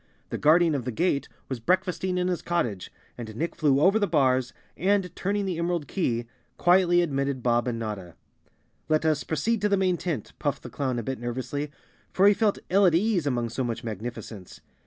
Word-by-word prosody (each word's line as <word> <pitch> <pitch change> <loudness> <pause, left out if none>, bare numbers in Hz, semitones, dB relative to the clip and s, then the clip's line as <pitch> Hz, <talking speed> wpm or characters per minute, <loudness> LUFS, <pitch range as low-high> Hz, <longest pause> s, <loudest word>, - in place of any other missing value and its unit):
The - - -3
Guardian 160 +2 +5
of 135 -4 -1
the 125 - -3
Gate 145 +2 0 0.2
was 130 -3 -4
breakfasting 180 +5 0
in 180 0 +1
his 180 -2 -1
cot¬ 175 0 +1
tage, 100 -6 -6 0.3
and 110 -2 -7
Nick 165 +8 -3
flew 145 -4 +3
over 195 +8 +4
the 205 - +1
bars 130 -6 +2 0.2
and, 195 0 +1
turning 200 +1 -1
the 180 -3 -2
em¬ 170 - 0
erald 175 -4 -1
key, 120 - -1 0.3
quietly 175 -1 +4
admitted 140 -4 -2
Bob 120 0 +2
and 120 -2 -1
Notta. 105 -6 -5 0.4
" - - -42
Let 155 0 +2
us 155 -2 +2
proceed 205 +8 -1
to 210 - +2
the 200 - +3
main 185 -2 +2
tent," 160 - -4
puffed 145 -2 -2
the - - -8
clown 130 -4 -2
a 120 - -2
bit 130 +2 -4
nervously, 125 +4 -3 0.4
for 195 +2 +4
he 205 - +7
felt 210 -1 +1
ill 195 +1 +5
at 165 - +3
ease 185 -4 +1
among 120 -3 0
so 125 +3 -2
much 115 0 -3
magnificence. 110 -3 -7
150 Hz, 210 wpm, -26 LUFS, 120-180 Hz, 0.4 s, he